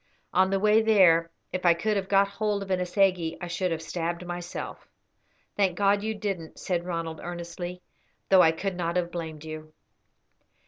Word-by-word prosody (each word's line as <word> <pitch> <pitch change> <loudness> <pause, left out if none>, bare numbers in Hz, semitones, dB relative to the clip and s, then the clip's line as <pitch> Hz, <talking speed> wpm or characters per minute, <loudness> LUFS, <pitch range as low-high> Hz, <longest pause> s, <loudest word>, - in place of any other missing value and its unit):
On 190 0 +4
the 195 0 +1
way 215 +2 +5
there, 180 -7 +5 0.2
if 185 - -2
I 170 -2 +5
could 210 +5 0
have 195 -1 -2
got 200 0 +4
hold 205 0 -1
of 195 - -7
an 185 - +2
assegai 180 -2 +1
I - - -5
should 175 +2 -1
have 165 -1 -3
stabbed 170 +1 -3
myself." 175 0 -6 0.7
"Thank 190 -3 +1
God 200 0 +3
you 220 +1 -2
didn't," 195 -6 -4
said 175 -2 -2
Ronald, 165 -2 -4
earnestly, 175 +1 -6 0.5
"though 190 -1 +7
I 160 - +6
could 190 +3 -3
not 170 -1 -2
have 175 -1 0
blamed 160 -3 -6
you." 155 0 -8
180 Hz, 180 wpm, -27 LUFS, 170-195 Hz, 0.7 s, though